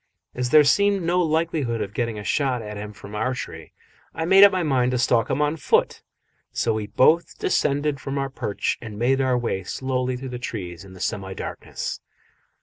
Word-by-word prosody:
As 125 0 -2
there 150 +3 +7
seemed 200 +5 +3
no 175 +2 +1
likelihood 160 -7 0
of 100 -2 -4
getting 115 -2 -2
a 105 - -6
shot 125 +2 0
at 105 0 -7
him 105 +1 -6
from 105 0 -12
our 110 +5 -1
tree, 80 - -8 0.4
I 160 - -2
made 190 +3 +7
up 200 - +9
my 185 -2 0
mind 130 -5 +2
to - - +1
stalk 120 -2 +2
him 150 - +1
on 150 +2 0
foot, 145 - +1 0.5
so 115 - 0
we 110 -1 -3
both 160 +10 +3
descended 145 -4 0
from 135 +1 -4
our 135 -1 -2
perch 110 -6 -2
and 110 -3 -8
made 130 +4 +2
our 130 -2 +2
way 115 -5 -2
slowly 130 +3 -2
through 130 +1 -7
the 125 -1 -6
trees 90 -8 -6
in 95 -1 -13
the 95 - -13
semi 95 0 -3
darkness. - - -5
125 Hz, 205 wpm, -23 LUFS, 110-150 Hz, 0.5 s, up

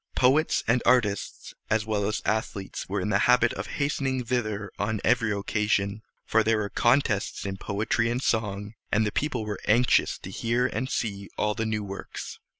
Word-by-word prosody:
Poets 140 +5 +3
and 120 +1 +3
artists, 115 -5 +1 0.2
as 110 -1 +1
well 105 -2 0
as 105 - -2
athletes, 105 -4 -2
were 100 - -1
in 105 - -2
the 100 -2 +3
habit 125 0 +5
of - - -5
hastening 135 -3 0
thither 110 -4 -2
on 105 +1 -1
every 115 -2 +2
occasion; 100 0 0 0.2
for 110 - +3
there 110 0 +2
were 105 -1 -2
contests 120 -6 +1
in 95 -1 -3
poetry 110 +4 0
and 125 +2 -2
song, 105 -2 -1 0.2
and 110 +1 +3
the 105 - -1
people 125 -5 -1
were 105 -2 -4
anxious 120 +4 +3
to 95 - -9
hear 120 +5 0
and 130 0 -2
see 100 -3 -3
all 105 0 +1
the 115 0 -2
new 110 -1 -1
works. 100 -1 -7
110 Hz, 180 wpm, -27 LUFS, 100-120 Hz, 0.2 s, habit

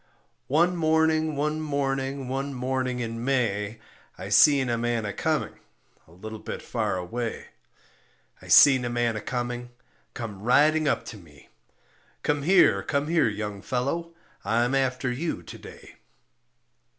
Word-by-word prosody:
One 170 +6 +2
morning, 160 -1 +2
one 150 +2 -1
morning, 135 -2 -2
one 135 +1 -3
morning 130 0 -2
in 115 0 -4
May 115 -5 -1 0.4
I 95 +1 -7
seen 135 +5 +5
a 120 - 0
man 115 -1 -1
a 100 - -3
coming, - - -2 0.5
a - - -20
little 110 +5 -9
bit - - -7
far - - -2
away; 115 +6 -5 0.9
I - - -13
seen 135 -3 +7
a 120 - -2
man 120 -1 0
a 105 - -4
coming, 120 0 -4 0.5
come 105 -5 -6
riding 150 +7 +3
up 140 - 0
to - - -10
me 75 -7 -18 0.7
"Come 145 -1 0
here, 160 - +4
come 140 +8 -2
here, 165 -5 +3
young 105 -1 -5
fellow, 155 +9 -3 0.3
I'm 120 +5 +1
after 130 -1 0
you 155 +7 -3
to - - -10
day." - - -13
125 Hz, 145 wpm, -26 LUFS, 115-145 Hz, 0.9 s, seen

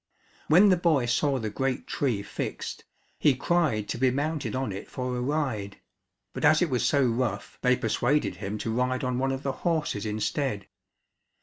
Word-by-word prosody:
When 185 +7 +7
the 185 - +4
boy 160 -7 +2
saw 135 +4 +1
the 110 -4 -3
great 135 +3 -2
tree 120 -8 -1
fixed, 100 - -5 0.3
he 145 - +4
cried 140 -8 +1
to - - -3
be 130 0 +4
mounted 140 -2 -2
on 130 -4 -1
it 95 - -7
for 125 -1 -3
a 125 - -2
ride, 125 -8 -2 0.6
but - - -5
as 155 - +6
it 175 -5 +1
was 125 - +1
so 140 -1 +3
rough 115 -4 -2
they 125 0 +4
persuaded 115 -3 0
him 100 +4 -4
to 110 - -1
ride 125 +2 0
on 125 -1 -1
one 135 +1 +1
of 135 0 -4
the 135 - 0
horses 155 - -1
instead. 105 0 -2
130 Hz, 185 wpm, -27 LUFS, 110-145 Hz, 0.6 s, When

